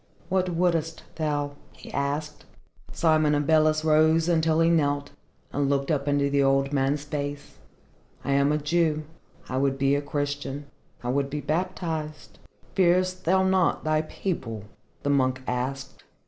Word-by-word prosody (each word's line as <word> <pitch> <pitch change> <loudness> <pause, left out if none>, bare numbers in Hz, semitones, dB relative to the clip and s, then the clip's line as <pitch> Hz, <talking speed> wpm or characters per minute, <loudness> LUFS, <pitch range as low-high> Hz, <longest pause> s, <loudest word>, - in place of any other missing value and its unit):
"What 185 -1 +1
wouldest 165 -2 0
thou?" 145 -2 -1 0.2
he - - -13
asked. 145 +2 -3 0.5
Simon 155 -2 +3
Abeles 155 +1 +3
rose 160 +1 +4
until 160 -2 +2
he 165 - +4
knelt, 145 -3 +1 0.4
and 140 -1 +1
looked 140 +1 0
up 145 -2 -1
into 145 0 +2
the 140 0 +2
old 135 +1 +2
man's 140 +1 +1
face. 145 -1 -5 0.7
"I - - 0
am 140 +1 +3
a 150 - +2
Jew. 155 0 +1 0.4
I 130 - -3
would 135 0 +1
be 135 0 +2
a 145 - +1
Christian. 145 -1 -3 0.4
I 120 - -2
would 140 +2 0
be 150 +1 -3
baptized." 155 -1 -3 0.3
"Fearest 185 0 +2
thou 190 +3 +3
not 190 -2 +2
thy 155 0 +2
people?" 140 - -4 0.4
the 145 - +1
monk 130 -2 +1
asked. 135 +2 -4
150 Hz, 145 wpm, -26 LUFS, 140-160 Hz, 0.7 s, rose